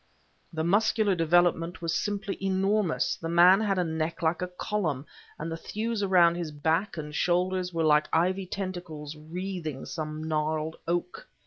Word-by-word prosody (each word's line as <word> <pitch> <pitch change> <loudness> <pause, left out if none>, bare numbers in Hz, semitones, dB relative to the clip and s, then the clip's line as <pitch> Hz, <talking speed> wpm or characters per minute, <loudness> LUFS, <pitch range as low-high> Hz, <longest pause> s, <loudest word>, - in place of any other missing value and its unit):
The 160 -2 -2
muscular 210 +3 +3
development 175 0 +2
was 165 -1 -2
simply 205 -1 -2
enormous; 195 -1 +1
the 165 - -5
man 175 +3 +7
had 200 -3 +1
a 180 - +2
neck 160 0 -3
like 160 +2 +1
a 180 - -1
column, 180 -6 -2 0.3
and 165 +2 -5
the - - -2
thews 220 +5 -3
around 180 -4 +5
his 170 -2 -4
back 160 +6 0
and 150 -1 -6
shoulders 180 +2 +1
were 165 -1 -1
like 150 -1 +4
ivy 185 +3 +1
tentacles 175 -6 -5
wreathing 160 -2 -5
some 155 -1 -5
gnarled 155 0 -1
oak. 175 - -2
175 Hz, 155 wpm, -28 LUFS, 160-190 Hz, 0.3 s, man